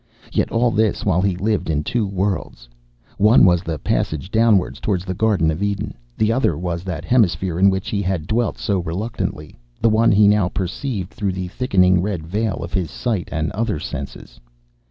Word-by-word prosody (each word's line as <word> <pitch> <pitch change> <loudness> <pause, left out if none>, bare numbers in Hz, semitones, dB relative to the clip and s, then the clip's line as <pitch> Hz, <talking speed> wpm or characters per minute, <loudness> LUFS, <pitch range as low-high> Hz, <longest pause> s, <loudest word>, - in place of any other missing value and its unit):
Yet - - 0
all 120 +1 +2
this 110 -1 0
while 90 -3 +2
he 95 -2 +1
lived 100 0 -1
in 75 -1 0
two 110 +4 -1
worlds. 95 -11 -3 0.5
One 105 +2 +6
was 90 -2 +4
the 80 -3 -4
passage 80 +5 -2
downwards 110 -4 +2
towards 95 -3 -1
the 95 - -3
Garden 100 -5 +2
of 80 +4 -5
Eden. 100 0 -2 0.2
The 110 0 +2
other 115 - +1
was 85 -1 -3
that 85 -5 -4
hemisphere 95 -7 +1
in 100 +1 +6
which 95 -1 -2
he 100 - -1
had 90 -5 -2
dwelt 115 +5 0
so 100 -2 -1
reluctantly, 85 -3 -4 0.2
the 115 - +3
one 110 +1 +4
he 105 +1 +5
now 105 -3 +3
perceived 95 +1 -4
through 100 -3 -2
the 90 -1 -4
thickening 90 -6 +2
red 90 -5 -3
veil 100 +1 -2
of 85 - -8
his 90 -4 -1
sight 110 -8 -3
and 80 -1 -1
other 110 -5 -2
senses. 70 -4 -7
95 Hz, 190 wpm, -20 LUFS, 85-105 Hz, 0.5 s, One